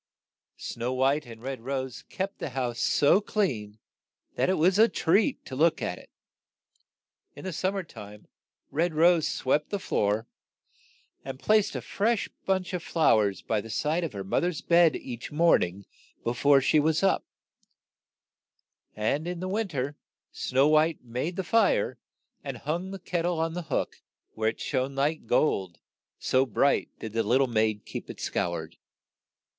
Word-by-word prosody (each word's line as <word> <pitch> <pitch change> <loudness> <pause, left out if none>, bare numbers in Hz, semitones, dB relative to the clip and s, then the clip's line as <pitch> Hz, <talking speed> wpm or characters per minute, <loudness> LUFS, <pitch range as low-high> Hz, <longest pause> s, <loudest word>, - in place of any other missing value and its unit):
Snow 120 +2 -4
White 135 +3 +1
and 115 -1 -11
Red 135 -2 -5
Rose 130 0 -4
kept 195 +2 -4
the - - -3
house 125 -2 -3
so 150 +8 +4
clean 120 - -2 0.6
that - - +1
it 190 - +3
was 180 +5 +3
a 225 +1 +7
treat 205 - +1
to 130 - -7
look 160 +4 +3
at - - -3
it. - - -17 1.3
In - - -10
the 185 - -3
sum 190 +5 -1
mer 195 - -2
time, 105 -8 -12 0.5
Red 165 +2 0
Rose 165 0 +4
swept 145 +3 0
the 200 - -1
floor, 105 - 0 1.0
and 135 -1 -6
placed 215 +3 +2
a - - -4
fresh 220 +2 0 0.2
bunch 190 -1 0
of 180 - -2
flow 160 -9 +3
ers 100 -2 -1
by 110 -2 0
the 115 - -11
side 155 +9 0
of 165 - -3
her 100 -1 -5
moth 95 - 0
er's 175 -4 -2
bed 170 -2 +4
each 120 -2 -7
morn 165 +3 +4
ing 95 +3 -4 0.4
be 120 - +1
fore 140 +2 +4
she 150 +3 +3
was 160 +4 +1
up; 195 - +3 1.7
and 140 +10 -1
in 175 -1 -4
the 185 - -3
win 210 +3 -1
ter, 145 -3 -3 0.4
Snow 135 +3 +2
White 155 0 +3
made 125 +9 -3
the 190 - -2
fire 480 - +2 0.4
and - - -5
hung 175 +5 -3
the 195 - -6
ket 180 -2 -2
tle 175 -1 0
on 165 0 0
the 170 -2 -6
hook, - - -2 0.3
where 110 0 +1
it - - -7
shone 135 0 -2
like 145 +3 -1
gold, 95 - +1 0.4
so 130 +1 +2
bright 125 -7 +1
did 110 -2 -7
the 115 - +1
lit 115 +4 +3
tie 135 - +4
maid 110 -3 0
keep - - -7
it - - -8
scoured. 85 -1 -3
145 Hz, 175 wpm, -27 LUFS, 120-175 Hz, 1.7 s, a